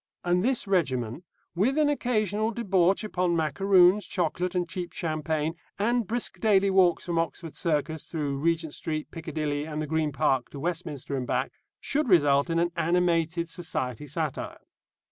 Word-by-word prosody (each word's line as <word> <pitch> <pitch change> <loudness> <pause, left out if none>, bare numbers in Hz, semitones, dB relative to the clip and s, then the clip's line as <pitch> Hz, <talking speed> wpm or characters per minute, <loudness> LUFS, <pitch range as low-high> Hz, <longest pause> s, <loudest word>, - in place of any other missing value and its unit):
And 175 +1 +2
this 255 0 +1
regimen, 130 - 0 0.3
with 225 - +1
an 305 -1 +4
occasional 220 -6 0
debauch 195 -4 +2
upon 180 -4 0
macaroons, 180 +5 +4
chocolate, 180 +1 -1
and 175 -1 0
cheap 175 0 -5
champagne, 155 -1 -1 0.2
and 235 +1 +1
brisk 240 +3 -2
daily 200 -3 +3
walks 185 -3 +3
from 170 -2 0
Oxford 165 0 -4
Circus, 160 -1 -1
through 145 -4 -3
Regent 165 0 0
Street, 155 -1 -4
Piccadilly, 150 -2 -3
and 150 -1 -4
the 155 - -1
Green 155 0 0
Park, 130 -2 +1
to 140 - -9
Westminster 155 -4 -3
and 130 -2 -3
back, - - -1 0.3
should 290 -2 0
result 145 -4 +4
in 165 - 0
an 170 +1 +1
animated 170 0 +1
society 150 -6 -4
satire. 150 0 -4
170 Hz, 155 wpm, -27 LUFS, 155-190 Hz, 0.3 s, an